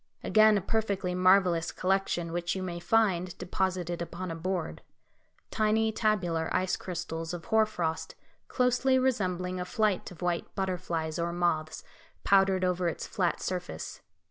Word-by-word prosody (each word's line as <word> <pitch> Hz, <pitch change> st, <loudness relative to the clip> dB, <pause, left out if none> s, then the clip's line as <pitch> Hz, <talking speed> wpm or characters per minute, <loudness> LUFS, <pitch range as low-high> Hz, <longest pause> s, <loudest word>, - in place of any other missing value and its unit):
Again 215 Hz, -1 st, +5 dB
a -, -, -1 dB
perfectly 200 Hz, -3 st, -1 dB
marvellous 180 Hz, -2 st, +3 dB
collection 185 Hz, -3 st, 0 dB
which 175 Hz, +1 st, -2 dB
you 190 Hz, -, -3 dB
may 175 Hz, -2 st, -4 dB
find 185 Hz, -3 st, +1 dB
deposited 180 Hz, -1 st, -2 dB
upon 175 Hz, +1 st, -5 dB
a -, -, -4 dB
board; 175 Hz, 0 st, -3 dB, 0.7 s
tiny 220 Hz, 0 st, +2 dB
tabular 180 Hz, -7 st, 0 dB
ice 185 Hz, 0 st, +1 dB
crystals 165 Hz, -2 st, -5 dB
of 165 Hz, -, -9 dB
hoar 220 Hz, -1 st, +3 dB
frost 165 Hz, -6 st, -3 dB, 0.3 s
closely 250 Hz, +1 st, +2 dB
resembling 185 Hz, -8 st, 0 dB
a -, -, -1 dB
flight 210 Hz, +1 st, 0 dB
of 180 Hz, -1 st, -10 dB
white 175 Hz, -1 st, -2 dB
butterflies 175 Hz, -4 st, -2 dB
or 170 Hz, 0 st, -1 dB
moths 165 Hz, -3 st, -1 dB, 0.4 s
powdered 195 Hz, -1 st, +4 dB
over 180 Hz, -1 st, 0 dB
its 165 Hz, -, -3 dB
flat 180 Hz, -3 st, -1 dB
surface. 180 Hz, -, -5 dB
180 Hz, 145 wpm, -29 LUFS, 170-200 Hz, 0.7 s, Again